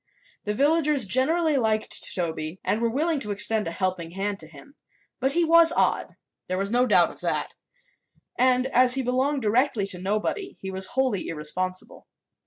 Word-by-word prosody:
The 210 0 -2
villagers 295 -1 +2
generally 305 - +3
liked 220 -3 -1
Toby 165 -1 -4
and 215 - -1
were 235 - +1
willing 305 +5 -1
to 210 - -6
extend 210 +1 +1
a - - -3
helping 185 -2 -2
hand 195 +3 -4
to 155 - -8
him; 160 - -16 0.5
but 265 +1 0
he 345 0 +2
was 330 0 +6
odd - - 0 0.3
there 185 - -2
was 195 +2 -3
no 245 +1 +2
doubt - - +4
of - - -18
that - - -2 0.8
and 255 0 +2
as 255 -1 +3
he 265 - -2
belonged 260 +2 -1
directly 225 0 +1
to 185 -2 -4
nobody 215 - -3
he 190 - -6
was 190 0 +1
wholly 255 -8 0
irresponsible. 185 +4 -4
225 Hz, 175 wpm, -24 LUFS, 190-270 Hz, 0.8 s, was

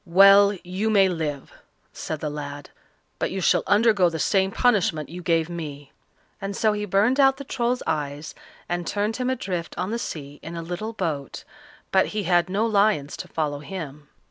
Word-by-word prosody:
"Well, 195 +2 +7
you 185 +5 -2
may 195 -3 +5
live," 155 -5 -4 0.4
said 155 -2 -5
the 150 - -2
lad, 145 -1 -7 0.5
"but - - 0
you 190 - -3
shall 185 - +3
undergo 205 -4 +4
the 165 - -4
same 190 +3 +2
punishment 195 - +1
you 175 +3 -7
gave 165 -2 +1
me;" 150 -5 -7 0.5
and 195 0 -4
so 215 -1 +2
he 210 0 -3
burned 210 +8 +2
out 270 -1 +5
the 280 - -7
Troll's 250 -2 -1
eyes, 145 0 -3 0.3
and 175 -1 -3
turned 210 +2 -1
him 255 0 -1
adrift 185 -9 -3
on 190 - -2
the 235 - -2
sea 145 -8 -6
in 165 +2 -7
a 165 - -5
little 180 +7 -5
boat, 150 -9 -4 0.5
but 190 - +4
he 210 - 0
had 175 -1 +2
no 205 +4 +1
lions 200 -9 +2
to - - -7
follow 150 -3 -2
him. 150 -3 -8
180 Hz, 185 wpm, -24 LUFS, 155-210 Hz, 0.5 s, Well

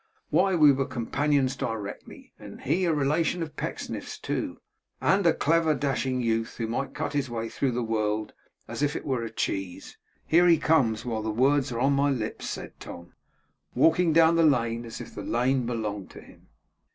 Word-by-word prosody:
Why, 185 +4 +3
we 150 -3 +7
were 135 0 0
companions 135 +2 0
directly! 110 -3 -6
and - - -11
he 185 +2 +1
a 170 - +2
relation 155 +4 +1
of 155 -2 -8
Pecksniff's - - -5
too, - - -3 0.4
and 195 +1 +2
a - - +6
clever, 160 0 +2
dashing 130 -2 -1
youth 115 -1 -1
who 115 - -2
might 120 +5 -3
cut - - -3
his 140 -3 -1
way 115 -1 -4
through 130 +1 -1
the 120 0 -1
world 110 -1 -1 0.3
as - - -6
if 145 +1 +1
it - - -5
were 130 -4 -1
a 115 - -4
cheese! 95 -4 -4 0.3
Here 175 +2 +4
he 170 -2 +6
comes 125 -10 +2
while 115 -3 -2
the 110 - -3
words 130 +4 +2
are 120 - -3
on 135 +3 +3
my 140 +1 +2
lips' 120 -6 -3
said - - -7
Tom; 85 0 -10 0.6
'walking 160 +6 +4
down 165 +1 +5
the 165 - +4
lane 120 -5 +2
as 115 0 -8
if - - -10
the - - -6
lane 125 +1 0
belonged 105 -5 -3
to - - -12
him. - - -18
130 Hz, 190 wpm, -27 LUFS, 115-150 Hz, 0.6 s, we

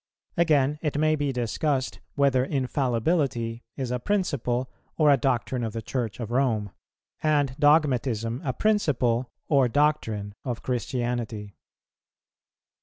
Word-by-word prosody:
Again, 150 -3 +3
it 150 -3 -1
may 155 +1 +3
be 145 -2 -1
discussed 130 +2 -1 0.2
whether 140 -3 +3
infallibility 130 -2 0 0.2
is 130 -3 -3
a 125 - -1
principle 130 - 0 0.3
or 150 -2 +5
a - - +7
doctrine 125 -1 0
of 110 -2 -3
the 115 - -3
Church 115 -2 -3
of 115 -2 -5
Rome, 115 -6 +1 0.5
and 145 -4 +2
dogmatism 130 -6 +2
a 130 - 0
principle 130 - +1 0.2
or 135 -4 +4
doctrine 115 -8 0
of 120 -4 -4
Christianity. 120 -4 -2
130 Hz, 120 wpm, -26 LUFS, 120-145 Hz, 0.5 s, a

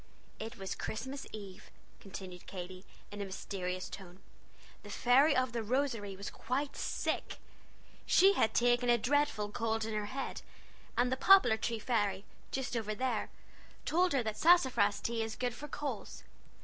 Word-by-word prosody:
"It 225 +2 -6
was 195 -1 -4
Christmas 265 +5 -5
Eve," 200 -3 -9 0.3
continued 185 -2 -9
Katy, 185 0 -7 0.3
in 205 0 -6
a - - -2
mysterious 185 -1 -4
tone. 185 -2 -10 0.6
"The - - -11
fairy 270 +5 +4
of 255 -1 +2
the 235 -1 -2
Rosary 230 -4 -1
was 200 +1 -6
quite 275 +4 -2
sick. - - -2 0.7
She 390 +2 +6
had 220 - +1
taken 245 0 +3
a 240 - +6
dreadful 250 -4 +1
cold 225 0 -1
in 220 - -4
her 210 -1 -2
head, 270 +4 -4 0.6
and 245 +1 +3
the 260 - +1
poplar 325 - +7
tree 230 +1 -2
fairy, 205 -4 0 0.2
just 265 -2 -3
over 215 -2 -2
there, 250 -2 -1 0.6
told 355 +1 +2
her 265 -3 +2
that 220 -1 -3
sassafras 255 - +4
tea 230 -1 -1
is 220 0 -3
good 245 -1 -2
for 295 +5 -8
colds. 295 0 -5
225 Hz, 160 wpm, -33 LUFS, 205-260 Hz, 0.7 s, poplar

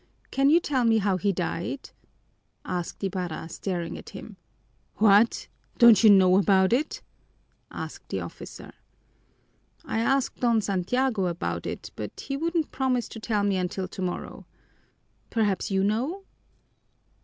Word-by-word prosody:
Can 275 +1 +3
you 325 +3 +6
tell 275 -7 0
me 225 -1 +4
how 195 -3 +1
he 200 +2 +1
died?" 180 +7 -4 0.7
asked 180 +2 -4
Ibarra, 180 -4 -3
staring 175 -2 -4
at - - -11
him. - - -10 0.6
"What! 210 +1 +4 0.3
Don't 235 -4 +7
you 220 - +8
know 190 -2 +6
about 190 0 +3
it?" 290 +6 -1 0.7
asked - - -8
the - - -2
officer. - - -9 1.1
"I 225 - -2
asked 270 +3 0
Don 235 -2 +3
Santiago 200 +2 0
about 175 +1 -3
it, - - -6
but - - -7
he 275 - -4
wouldn't 330 +2 -1
promise 255 -3 0
to 225 - -8
tell 215 -2 -1
me 200 -2 +1
until 185 +1 -2
tomorrow. 185 -1 -5 0.8
Perhaps 210 -4 0
you 195 -1 +1
know?" 255 - -1
205 Hz, 135 wpm, -26 LUFS, 185-250 Hz, 1.1 s, you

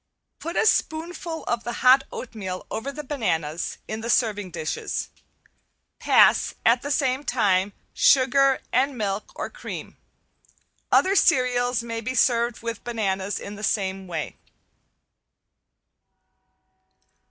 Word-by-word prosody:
Put 335 +2 -5
a - - +2
spoonful 330 -2 -1
of 235 -1 -2
the 240 - -4
hot 265 +2 +7
oatmeal 195 -7 -6
over 225 +6 -3
the 300 +2 -7
bananas 170 - -2
in 220 +1 -4
the 230 - -5
serving 210 -6 +1
dishes. 160 -2 -4 0.9
Pass - - +4
at 235 +2 +4
the 285 - -5
same 270 -1 +1
time 200 -6 +1 0.2
sugar 270 0 +4
and 265 +1 +2
milk 205 -1 -3
or - - -4
cream. - - -8 0.9
Other 385 +1 +4
cereals 250 - +2
may 230 -1 -4
be 255 +3 -4
served 235 -1 +2
with 230 -2 -5
bananas 200 -4 -2
in 205 0 -8
the 210 - -9
same 190 -3 -1
way. 160 -4 -5
235 Hz, 120 wpm, -24 LUFS, 205-265 Hz, 0.9 s, hot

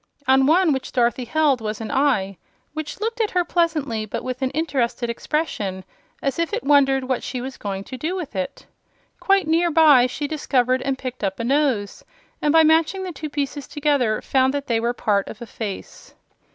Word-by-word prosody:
On 265 0 +5
one 330 0 +4
which 265 -1 -4
Dorothy 245 0 +1
held 295 -2 +2
was 215 -1 -4
an 220 -1 -5
eye, 245 -9 +1 0.4
which 310 +2 -6
looked 455 +2 -2
at 430 - +1
her 360 -1 0
pleasantly 310 -11 0
but 215 - -5
with 255 +1 -5
an 260 - +1
interested 260 -5 -1
expression, 210 - -3 0.4
as 275 +2 -1
if 335 +3 -1
it 470 - -2
wondered 270 -2 +4
what 255 -1 -1
she 255 - -4
was 260 +2 -6
going 195 -1 -5
to 255 - -8
do 320 +8 -3
with 340 - -6
it. 185 -1 -4 0.5
Quite 390 -1 +3
near 335 +2 +2
by 300 -6 +6
she 285 +3 -4
discovered 260 -4 +1
and 270 -1 -1
picked 255 -3 -6
up 195 +1 -2
a - - -2
nose, 255 -6 0 0.4
and 295 - +2
by 325 +1 +6
matching 325 +4 +3
the 370 - -4
two 310 0 -6
pieces 285 -1 -3
together 280 -7 0
found 265 +1 +2
that 285 -1 -3
they 230 -3 +1
were 235 +1 0
part 205 -4 0
of 220 - -9
a 235 - -7
face. 215 -4 -8
270 Hz, 200 wpm, -22 LUFS, 235-310 Hz, 0.5 s, by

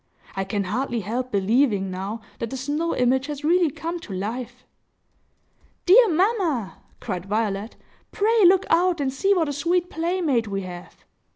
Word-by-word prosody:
I 195 0 -2
can 200 +1 -2
hardly 235 +4 -2
help 245 +6 -3
believing, 205 -1 +1
now, 195 +5 -5 0.2
that 230 - -3
the 265 - -5
snow 295 +6 -2
image 260 +2 +1
has 295 -1 -6
really 340 +1 +3
come 335 +5 -5
to 225 -12 -9
life!" 240 +6 -5 1.2
"Dear 445 +5 +7
mamma!" 340 - 0 0.2
cried 180 +1 -5
Violet, 210 0 -2 0.4
"pray 440 +1 +2
look 375 +1 +5
out 345 0 +3
and 270 -2 -1
see 395 +8 +2
what 330 -4 +1
a 290 - -2
sweet 345 +5 0
playmate 325 -8 0
we 195 -1 -3
have!" 180 -1 -10
265 Hz, 160 wpm, -23 LUFS, 210-340 Hz, 1.2 s, Dear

